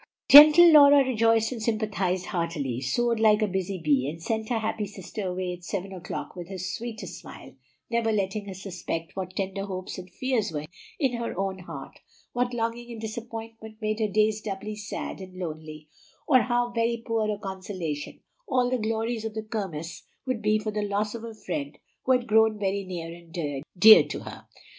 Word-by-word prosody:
Gentle 305 +4 +10
Laura 285 -2 +8
rejoiced 225 -2 +2
and 240 -3 -5
sympathized 210 -5 -1
heartily, 160 - -2
sewed 235 - 0
like 215 -1 +4
a - - +2
busy 190 0 -2
bee, 145 -5 +1
and 165 +2 -7
sent 220 +5 -3
her 240 - +1
happy 220 -1 -2
sister 195 +1 -6
away 180 0 -3
at 175 0 -11
seven 195 +1 -4
o'clock 175 0 -6
with 175 -1 -8
her 190 - -6
sweetest 190 0 -6
smile, - - -12 0.4
never 230 -1 0
letting 200 0 -1
her 195 - -5
suspect 175 -3 -5
what 185 -1 -5
tender 195 0 -3
hopes 185 -1 -6
and 185 0 -10
fears 230 0 -1
were 150 -2 -3
hidden 155 +4 -13 0.2
in 270 -5 +1
her 235 -5 -4
own 190 0 -2
heart, 180 - -9 0.3
what 245 0 0
longing 235 0 -3
and 230 - -7
disappointment 225 0 -7
made 215 0 -2
her 220 - +1
days 215 +1 +1
doubly 210 +1 -5
sad 210 -1 -6
and 185 -1 -10
lonely, 155 -3 -7 0.4
or 265 -5 +6
how 240 0 0
very 235 0 0
poor 225 -2 0
a 210 - -1
consolation 185 -6 -5 0.3
all 250 -5 +1
the 255 - +1
glories 225 +1 -2
of 220 -1 -5
the 220 - -3
Kirmess 190 -7 -5 0.2
would 255 -4 -2
be 215 0 +3
for 215 0 -3
the 210 0 -2
loss 205 +1 -1
of 230 -1 -7
a 230 -1 -7
friend 150 -9 -5 0.3
who 260 - +4
had 250 -1 +1
grown 220 -1 +4
very 200 -1 -1
near 170 -3 -6
and 165 -5 -5 0.2
dear 215 +4 +10
to - - -5
her. - - -10
210 Hz, 190 wpm, -26 LUFS, 185-225 Hz, 0.4 s, Gentle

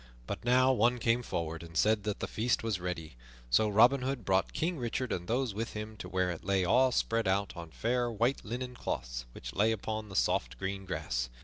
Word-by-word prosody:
But - - -5
now 130 +2 +5
one 120 +1 +3
came 115 +1 +2
forward 80 -7 -3
and 85 -1 -7
said 105 +1 +3
that 105 -2 -2
the - - -1
feast 115 +1 0
was 110 -5 -1
ready; 80 -6 -5 0.3
so 110 - +4
Robin 120 +6 +5
Hood 130 -4 -2
brought 95 -1 +2
King 165 -1 -1
Richard 120 +1 -2
and 90 0 -3
those 120 0 0
with 110 +3 -4
him 110 +1 -6
to - - -7
where 90 -1 +1
it 85 - -7
lay 95 -1 +1
all 125 +7 +4
spread 115 -3 +1
out 100 +1 +1
on 85 -2 -7
fair 120 +8 0
white 120 +5 0
linen 125 +3 -4
cloths - - -4
which - - -8
lay 110 +3 +3
upon 110 0 -3
the 100 - -8
soft - - +1
green 95 0 -4
grass. 70 -9 -2
110 Hz, 215 wpm, -31 LUFS, 90-120 Hz, 0.3 s, now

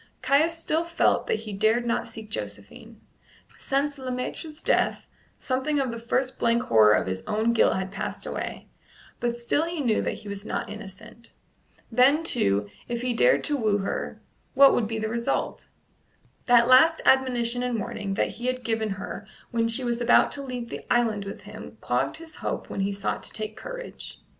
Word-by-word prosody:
Caius 295 +6 +3
still 325 0 0
felt 335 0 +1
that 215 - 0
he 215 -2 -7
dared 220 +4 +2
not 235 - -1
seek 215 -1 -9
Josephine. 105 - -7 0.6
Since 280 +1 -1
Le 260 -1 -5
Maître's 300 +5 -5
death - - +1 0.3
something 270 +3 -1
of 265 -3 0
the 230 - -6
first 255 +3 -1
blank 235 0 +2
horror 110 -2 +5
of - - +1
his 95 0 -3
own 220 +2 +1
guilt 230 - +4
had 190 0 -3
passed - - -5
away, - - -5 0.5
but 240 0 -1
still 240 +6 +1
he 335 -1 -4
knew 240 -6 +1
that - - -2
he - - -12
was 200 0 -6
not 210 - -4
innocent. 215 +2 -11 0.6
Then, 265 +7 +4
too, 100 - +1 0.2
if 240 0 -3
he 250 -1 0
dared - - +3
to 295 - 0
woo 215 -6 +1
her, 195 -1 -4 0.4
what 275 +1 +8
would 225 - +1
be 225 0 -3
the 220 0 -2
result? 235 +1 -2 0.8
That 240 -1 +6
last 290 +6 +6
admonition 245 -2 +3
and 250 -2 -1
warning 200 -1 -4
that - - +1
he 240 +2 -6
had 255 0 -2
given 225 -1 -1
her 200 +1 -7 0.2
when 230 -1 +1
she 230 +3 +1
was 240 -1 -1
about 240 0 +5
to 285 - -3
leave 250 -3 -5
the - - -6
island 225 -4 +2
with 200 - -7
him - - -11
clogged - - -1
his 325 -1 -10
hope - - -4
when - - -4
he 195 +1 0
sought 200 0 -3
to - - -2
take 215 -1 -4
courage. - - -8
235 Hz, 190 wpm, -26 LUFS, 215-265 Hz, 0.8 s, what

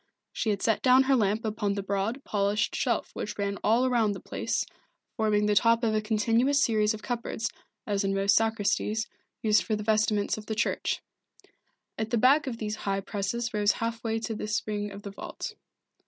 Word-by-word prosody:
She 220 - -1
had 200 -2 -1
set 225 - +2
down 255 0 +6
her 270 0 +3
lamp 215 -1 +1
upon 205 -2 -1
the 200 - -3
broad, 200 +7 -2
polished 205 +1 0
shelf - - 0
which 210 0 -5
ran 200 -1 -2
all 235 +4 +3
round 225 -5 +2
the - - -7
place, - - -2 0.5
forming 210 -2 +2
the 210 - +3
top 230 +4 +4
of 220 -1 +2
a 215 - +1
continuous 230 +6 +2
series 215 -1 +2
of 215 - -11
cupboards, 235 -2 -3 0.3
as 200 -1 0
in 195 0 0
most 195 0 +3
sacristies, 220 0 +1 0.4
used 215 -1 +4
for 215 - -1
the 210 - -4
vestments 215 -1 +1
of 210 - -12
the 220 - -2
church. - - -1 1.0
At 220 0 -2
the 235 - +1
back 270 +6 +4
of 240 -3 -3
these 215 -1 -3
high 195 -1 -1
presses 215 +4 -3
rose 210 -1 +3
half 230 0 -3
way 225 -1 0
to 225 - -3
the 210 - -4
spring 210 -1 -2
of 200 +1 -9
the 200 - -6
vault. 200 - -7
215 Hz, 200 wpm, -28 LUFS, 205-230 Hz, 1.0 s, down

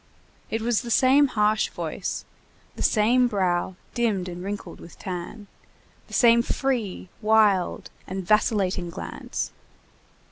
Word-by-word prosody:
It 225 0 -2
was 235 -2 +1
the 240 - -7
same 265 +4 +5
harsh 215 -3 +1
voice, - - -4 0.5
the - - -7
same 245 +3 +3
brow 185 -4 0 0.2
dimmed 215 -7 0
and 180 0 -6
wrinkled 195 -3 -6
with 170 - -13
tan, 185 +3 -6 0.6
the - - -14
same 235 -2 +6
free, 235 -8 -2
wild, 210 -4 +2 0.2
and 190 0 -4
vacillating 195 -4 +1
glance. 175 - -5
210 Hz, 120 wpm, -25 LUFS, 185-235 Hz, 0.6 s, same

